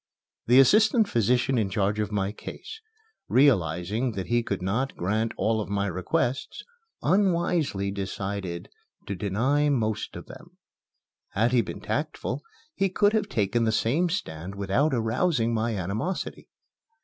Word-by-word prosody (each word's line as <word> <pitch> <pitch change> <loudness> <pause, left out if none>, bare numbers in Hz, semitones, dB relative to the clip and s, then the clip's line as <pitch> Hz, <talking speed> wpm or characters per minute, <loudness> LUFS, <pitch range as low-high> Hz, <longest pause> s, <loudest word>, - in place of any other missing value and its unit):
The 125 +3 +7
assistant 215 - +5
physician 125 - +2
in 105 -3 0
charge 100 +2 0
of 105 -1 -1
my 100 -1 0
case, 440 - -9 0.5
realizing 110 - +2
that 95 -3 -4
he 120 0 +1
could 100 -4 -3
not 115 +8 -1
grant 110 +5 0
all 110 0 +1
of 100 - -6
my 100 0 0
requests, 100 +7 -2 0.4
unwisely 170 - +1
decided 95 -2 -4 0.4
to 100 - -3
deny 115 +10 +1
most 110 -6 -1
of - - -8
them. - - -14 0.8
Had 115 +4 +2
he 125 -2 +4
been - - -7
tactful, - - -3 0.3
he 195 -7 +1
could 205 +3 +2
have 210 -2 0
taken 115 - +1
the 110 - +2
same 140 +11 +1
stand 95 - -4
without 100 +10 +1
arousing 120 +1 +1
my 115 0 0
animosity. 105 - -3
115 Hz, 140 wpm, -26 LUFS, 100-140 Hz, 0.8 s, The